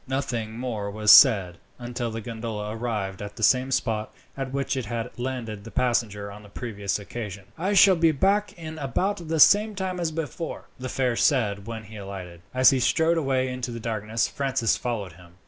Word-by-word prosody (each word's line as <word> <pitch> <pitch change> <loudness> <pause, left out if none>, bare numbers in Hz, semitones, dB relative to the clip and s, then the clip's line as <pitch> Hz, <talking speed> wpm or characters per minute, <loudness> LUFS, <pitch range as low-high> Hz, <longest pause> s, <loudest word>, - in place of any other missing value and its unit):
Nothing 120 -5 -3
more 115 -5 -3
was 105 +1 +3
said, 100 -10 +7 0.2
until 120 -1 -4
the 115 0 -5
gondola 110 -1 -5
arrived 105 -5 -3
at 100 0 -7
the 110 - -6
same 130 +3 +4
spot 110 -4 -1 0.2
at 135 -1 -4
which 135 0 -1
it 130 -5 -3
had 115 +2 -4
landed 120 -5 -4
the 115 - -9
passenger 115 -5 -1
on 105 +1 -11
the 105 - -15
previous 105 -3 -3
occasion. 100 -2 -7
"I 185 +5 -1
shall 190 0 +7
be 165 -1 +4
back 200 +7 +1
in 160 -1 -7
about 170 - -2
the 160 0 -1
same 210 +6 +6
time 190 -2 -3
as 170 -2 0
before," 160 0 -5
the 130 0 -5
fare 125 -2 0
said 105 -8 +1
when 115 -1 -6
he 110 +1 -11
alighted. 95 -4 -8
As 130 0 +6
he 135 - +1
strode 160 +6 +2
away 135 -3 0
into 125 -1 -4
the 115 -1 -5
darkness, 110 0 -1
Francis 135 -5 0
followed 105 -8 -4
him. 85 0 -17
120 Hz, 195 wpm, -25 LUFS, 105-135 Hz, 0.2 s, said